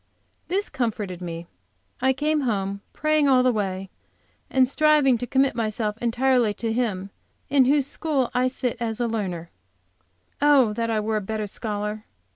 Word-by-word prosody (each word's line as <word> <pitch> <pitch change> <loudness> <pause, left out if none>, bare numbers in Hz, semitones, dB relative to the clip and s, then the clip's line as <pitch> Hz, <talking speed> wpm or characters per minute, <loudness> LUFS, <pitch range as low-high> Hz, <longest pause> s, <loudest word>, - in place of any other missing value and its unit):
This 395 +3 0
comforted 210 -7 -3
me. 170 -1 -6 0.6
I 265 +1 +4
came 300 +3 0
home, 200 -5 -2
praying 305 -1 +2
all 255 -1 +5
the 255 - +4
way, 195 -3 -3 0.6
and 260 -1 +4
striving 300 -2 +4
to 245 - -4
commit 265 +1 +2
myself 215 -1 -1
entirely 240 -2 +2
to 225 -1 -2
Him 205 -5 -2 0.4
in 270 -2 +5
whose 280 +1 +3
school 285 -3 -1
I 250 +1 +2
sit 255 -2 -2
as 225 -1 -3
learner. 200 -8 -3 0.9
Oh, 280 -7 +5
that 230 +1 -2
I 220 -1 +1
were 215 +1 -1
a - - -1
better 215 +2 -3
scholar. 210 0 -4
235 Hz, 155 wpm, -24 LUFS, 210-265 Hz, 0.9 s, all